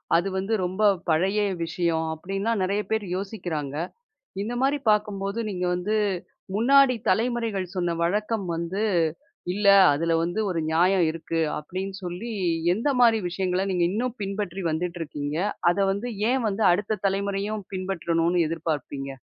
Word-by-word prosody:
அது 175 +3 +2
வந்து 195 +4 -1
ரொம்ப 190 +4 -2 0.3
பழய 190 +6 +2 0.2
விஷயம். 165 -1 0
அப்டின்னா 195 +6 -2
நெறய 200 +3 +1
பேர் 220 -2 0
யோசிக்குறாங்க. 175 -8 -4 0.7
இந்த 220 +4 -3
மாரி 280 +2 +2
பாக்கும்போது 210 0 -1
நீங்க 180 -2 -2
வந்து, 190 +5 -1 0.6
முன்னாடி 265 +3 +5
தலைமுறைகள் 220 -3 0
சொன்ன 175 -2 0
வழக்கம் 210 +3 0
வந்து, 170 +5 -2 0.7
"இல்ல 205 0 0 0.3
அதுல 165 +3 0
வந்து 175 +5 -2
ஒரு 175 -3 -1
நியாயம் 180 +2 +4
இருக்கு." 165 0 -3 0.2
அப்டின்னு 190 +5 -5
சொல்லி 180 +7 -5 0.4
எந்த 225 +9 -2
மாரி 225 -2 +5
விஷயங்கள 185 +1 -1
நீங்க 175 -2 +2
இன்னும் 245 +4 -2
பின்பற்றி 195 -2 -3
வந்துட்டு 170 +2 -3
இருக்கீங்க. 145 -1 -4 0.3
அத 175 - -4
வந்து 205 +5 -3 0.2
ஏன் 260 -1 +1
வந்து 205 +2 -1
அடுத்த 210 +3 -1
தலைமுறையும் 200 +2 -2
பின்பற்றணும்னு 175 -2 0
எதிர்பார்ப்பீங்க? 150 -4 -3
190 Hz, 135 wpm, -25 LUFS, 170-210 Hz, 0.7 s, முன்னாடி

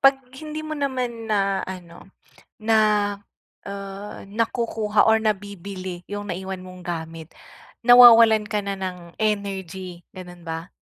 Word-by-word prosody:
'Pag 275 0 +6 0.2
hindi 310 0 -6
mo 310 - -5
naman 255 -6 -3
na 195 -2 +1
ano, 175 -1 -10 0.5
na 220 +1 +2 0.9
ah, 200 +1 -7
nakukuha 220 -1 +1
or 220 - +6
nabibili 195 -3 -4
yung 205 0 -6
naiwan 190 +1 -5
mong 185 0 -11
gamit, 165 -2 -6 0.5
nawawalan 230 -3 +8
ka 210 0 -2
na 200 0 -3
ng 180 -2 -7
energy. 190 -4 -3
Ganun 180 -2 -11
ba? 165 +1 -5
200 Hz, 120 wpm, -23 LUFS, 180-220 Hz, 0.9 s, nawawalan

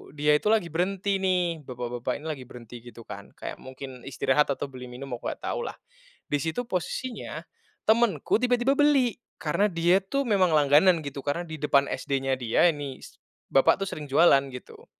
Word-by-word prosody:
dia 150 0 +2
itu - - -14
lagi 185 -7 +1
berhenti, 195 +4 0
nih. 180 -5 0
Bapak-bapak 120 -1 -4
ini - - -12
lagi 135 -5 -5
berhenti, 120 -1 -11
gitu 120 -1 -11
kan, 100 -2 -10
kayak - - -7
mungkin 130 -1 -10
istirahat 140 +2 +1
atau 135 +1 -5
beli 125 -1 -9
minum, 125 +3 -9
aku - - -16
enggak - - -4
tahulah. 475 - -3 0.5
Di 145 - 0
situ 165 +10 -2
posisinya, 235 +4 -4 0.4
temanku 225 -1 +3
tiba-tiba 250 +2 +2
beli. 275 -7 +3 0.2
Karena 175 +6 +2
dia 170 +2 +3
tuh 275 +9 -1
memang 195 -5 +3
langganan, 150 +5 +5
gitu. 140 0 -6
Karena 145 +5 -1
di 160 - -7
depan 140 -1 +3
SD-nya 135 -1 -1
dia, 125 +6 +2
ini 145 -5 -1
s - - -13 0.4
bapak 135 - +4
tuh 195 - -2
sering 150 -2 -6
jualan, 140 -2 +6
gitu. 125 - -11
150 Hz, 175 wpm, -26 LUFS, 135-195 Hz, 0.5 s, jualan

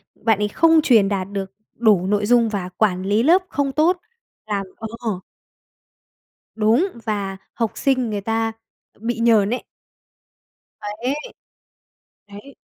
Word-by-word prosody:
bạn 220 -2 +1
ấy 210 - +1
không 325 +7 +4
truyền 220 -9 +4
đạt 190 -2 -2
được 195 -1 -4 0.2
đủ 210 -6 +3
nội 205 +1 +1
dung 235 0 +4
và 195 -4 -3
quản 185 -1 0
lý 205 +4 +2
lớp 350 +6 +5
không 275 -1 -1
tốt. 330 +6 +2 0.5
Làm 200 -2 -2
Ờ. 220 -3 -4 1.4
Đúng 225 - +3 0.2
và 200 -3 -2 0.2
học 230 -2 -1
sinh 255 -4 +1
người 205 -1 -2
ta 225 +2 -1 0.5
bị 230 +1 -2
nhờn 225 -3 +4
ấy. 245 - -2 1.2
Ấy. 220 +6 -3 1.1
Đấy. 205 +7 -12
220 Hz, 135 wpm, -21 LUFS, 205-245 Hz, 1.4 s, lớp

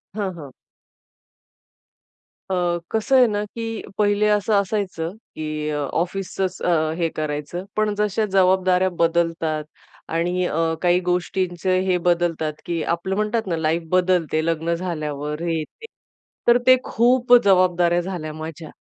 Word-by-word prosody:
हां, 200 -3 -2
हां. 145 -5 -10 2.0
अ, 175 -2 +1
कसं 220 +4 +1
आहे 250 - +6
ना, 210 -1 -1
की 225 +1 -5 0.2
पहिले 205 0 +2
असं 210 +1 +1
असायचं, 195 -4 -1 0.2
की 155 -1 -3
अ, 150 - -2 0.2
ऑफिसचंच 185 +1 -2 0.4
हे 170 -2 0
करायचं. 155 +4 -4
पण 215 -1 +1
जशा 210 +1 +1
जबाबदाऱ्या 185 -1 +3
बदलतात 165 -2 +1 0.5
आणि 175 +2 0
अ, 160 - -2 0.2
काही 175 0 +3
गोष्टींचं 180 0 0
हे 180 - +3
बदलतात, 170 -3 0
की 170 -2 -2
आपलं 170 +4 -1
म्हणतात 215 +1 -1
ना 170 -3 -1
लाइफ 160 +1 0
बदलते, 180 -4 +2
लग्न 165 0 0
झाल्यावर 150 -3 -4
हे-ते. 165 - -4 0.6
तर 240 0 +7
ते 255 - +9
खूप 245 +1 +2
जबाबदाऱ्या 180 -3 +3
झाल्या 170 -4 -5
माझ्या 155 0 -8
180 Hz, 125 wpm, -22 LUFS, 165-195 Hz, 2.0 s, ते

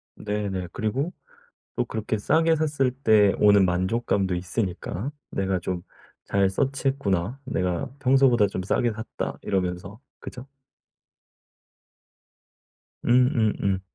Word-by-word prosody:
네네. 100 -4 -3
그리고 130 - -2 0.6
또 125 - +1
그렇게 110 -1 -3
싸게 160 +7 +3
샀을 145 -4 +1
때 110 -6 +4
오는 100 -2 +6
만족감도 95 +1 0
있으니까 95 +5 -3 0.2
'내가 95 -1 -1
좀 90 0 -4 0.4
잘 100 -1 +2
서치 135 +6 -1
했구나. 115 -2 0
내가 95 +1 -2
평소보다 130 -5 +4
좀 95 -1 -4
싸게 115 +4 +1
샀다.' 110 +2 -5
이러면서, 95 +3 -3 0.2
그죠? 125 +2 -9 2.6
음음음. 115 -6 +2
105 Hz, 230 characters per minute, -25 LUFS, 95-130 Hz, 2.6 s, 오는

